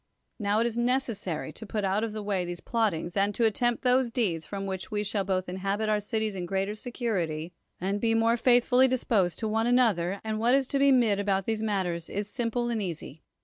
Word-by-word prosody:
Now 205 0 +1
it - - +2
is 235 0 -1
necessary 235 - -1
to 220 - -10
put 210 0 -2
out 195 +3 +1
of 225 - -2
the 215 0 -5
way 200 -3 0
these 175 0 -5
plottings 195 -7 -1
and 200 0 +1
to 235 - +2
attempt 240 +2 +1
those 255 0 +3
deeds 195 -10 -1
from 195 -1 -4
which 190 -1 -5
we 210 -1 -1
shall 205 -1 -1
both 185 -1 -1
inhabit 195 +4 -2
our 210 -1 +2
cities 220 0 -2
in 180 -2 -4
greater 195 +2 -1
secur 225 -3 -2
ity, 160 +1 -5 0.3
and 195 +3 -2
be 225 -1 +2
more 225 +1 +3
faithfully 245 +2 +4
disposed 215 -9 +1
to 220 - -2
one 225 +2 +1
an 245 +1 +4
other, 195 -6 +2
and 220 -1 -2
what 240 +3 +4
is 275 -1 +2
to 275 - 0
be 280 0 +5
said 205 -3 +1
about 195 -1 0
these 220 -1 -1
matters 185 -6 -1
is 205 0 -3
simple 240 +2 -2
and 230 -2 -1
easy. 165 -5 -6
210 Hz, 230 wpm, -28 LUFS, 190-230 Hz, 0.3 s, be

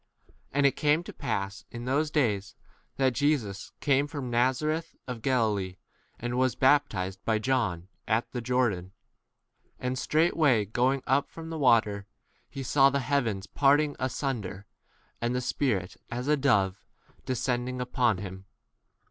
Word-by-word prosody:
9 - - -26 0.2
And 140 +1 +3
it 140 - +6
came 150 +3 +2
to - - -9
pass 100 0 -3
in 120 0 -7
those 145 +4 +1
days 105 -10 0 0.4
[that] 130 -2 +2
Jesus 120 -9 0
came 140 0 +2
from 140 -4 -5
Na 120 +2 +4
zareth 155 +5 -3
of 125 -3 -5
Galilee, 110 -8 0 0.4
and 120 +1 -2
was 130 -2 +2
bap 145 +2 +4
10 95 -1 -3
tized 95 - -16
by 110 -1 +1
John 110 -8 0 0.2
at 110 +2 0
the 125 - -3
Jordan. 115 -7 0 0.9
And 125 0 -2
straightway 155 -8 +3
going 125 +6 +1
up 135 +2 +2
from 165 0 -9
the 160 - -4
water, 110 -6 +3 0.4
he 135 - -6
saw 135 +1 +5
the 140 0 0
heavens 115 -7 0
parting 145 +3 +3
asunder, 120 -7 -3 0.6
and 120 +1 0
the - - +1
Spirit, 115 -8 -1
as 125 +2 -4
a 150 - +4
dove, 100 -9 +1 0.3
11 - - -30
descending 125 0 -1
upon 125 -4 +1
him. 95 0 -8
125 Hz, 155 wpm, -28 LUFS, 105-140 Hz, 0.9 s, it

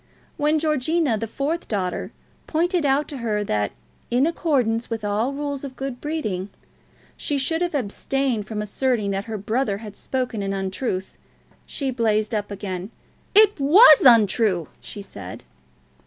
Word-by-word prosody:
When 300 0 +2
Georgina, 305 -2 +1
the 225 +1 -3
fourth 295 +9 -3
daughter, 185 -4 -2 0.4
pointed 340 -1 +1
out 275 +2 +2
to 285 - -6
her 215 -4 -1
that, 105 - -1 0.4
in 250 +4 +3
accordance 260 -9 0
with 225 -2 -3
all 210 +5 0
rules 285 -1 -4
of 270 -2 -7
good 265 -2 -5
breeding, 215 - -3 0.7
she 290 - -1
should 325 +5 0
have 350 -3 -1
abstained 255 -1 -1
from 210 -1 -3
asserting 215 -1 0
that 195 +1 -2
her 225 -1 -4
brother 215 +1 -1
had 210 -1 -9
spoken 250 -5 -3
an 195 0 -2
untruth, 190 0 -3 0.5
she 275 -2 -2
blazed 220 -2 0
up 205 -1 -1
again. 195 -2 -5 0.5
"It 420 -4 +6
was 305 - +8
untrue," 210 - +4
she 205 - -8
said. 95 - -9
235 Hz, 150 wpm, -23 LUFS, 205-285 Hz, 0.7 s, was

